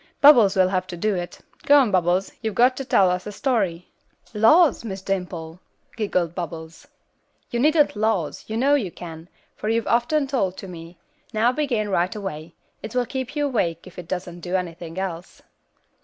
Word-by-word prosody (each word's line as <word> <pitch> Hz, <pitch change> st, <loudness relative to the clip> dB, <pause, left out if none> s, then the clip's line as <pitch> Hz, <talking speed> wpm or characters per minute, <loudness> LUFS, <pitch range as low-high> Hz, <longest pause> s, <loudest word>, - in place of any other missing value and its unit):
Bubbles 235 Hz, -9 st, +7 dB
will 185 Hz, -1 st, +4 dB
have 185 Hz, -1 st, -1 dB
to 180 Hz, -2 st, -7 dB
do 210 Hz, +4 st, 0 dB
it. 175 Hz, -2 st, -5 dB, 0.2 s
Go 290 Hz, 0 st, +5 dB
on 255 Hz, -7 st, +4 dB
Bubbles, 185 Hz, +1 st, +1 dB
you've 220 Hz, -3 st, -3 dB
got 250 Hz, +2 st, +4 dB
to 270 Hz, -, -3 dB
tell 190 Hz, -7 st, +3 dB
us 180 Hz, +2 st, -3 dB
a -, -, -4 dB
story." 200 Hz, -, -1 dB, 0.5 s
"Laws! 275 Hz, +9 st, +5 dB
Miss 195 Hz, -4 st, -6 dB
Dimple," 180 Hz, -4 st, -4 dB, 0.4 s
giggled 180 Hz, -6 st, -1 dB
Bubbles. 165 Hz, -2 st, -7 dB, 0.6 s
"You 235 Hz, -, -1 dB
needn't 300 Hz, +1 st, +3 dB
'laws,' 210 Hz, -7 st, -1 dB
you 220 Hz, -, -3 dB
know 275 Hz, +4 st, +3 dB
you 250 Hz, -10 st, +1 dB
can, 165 Hz, 0 st, -10 dB, 0.3 s
for 215 Hz, -, -4 dB
you've 230 Hz, 0 st, +1 dB
often 255 Hz, +5 st, +1 dB
told 235 Hz, -9 st, -1 dB
them -, -, -24 dB
to 195 Hz, -, -8 dB
me; 165 Hz, 0 st, -10 dB, 0.4 s
now 225 Hz, +3 st, +3 dB
begin, 250 Hz, -7 st, -1 dB
right 180 Hz, 0 st, 0 dB
away; 170 Hz, -5 st, -6 dB, 0.3 s
it 220 Hz, +3 st, -8 dB
will 250 Hz, -1 st, +2 dB
keep 260 Hz, +3 st, -5 dB
you 295 Hz, -1 st, +1 dB
awake 175 Hz, -, -1 dB
if 185 Hz, -1 st, -11 dB
it 175 Hz, -, -9 dB
doesn't 175 Hz, -1 st, -5 dB
do 175 Hz, +2 st, -3 dB
anything 170 Hz, -2 st, -4 dB
else." 185 Hz, -2 st, -5 dB
195 Hz, 185 wpm, -23 LUFS, 175-240 Hz, 0.6 s, Bubbles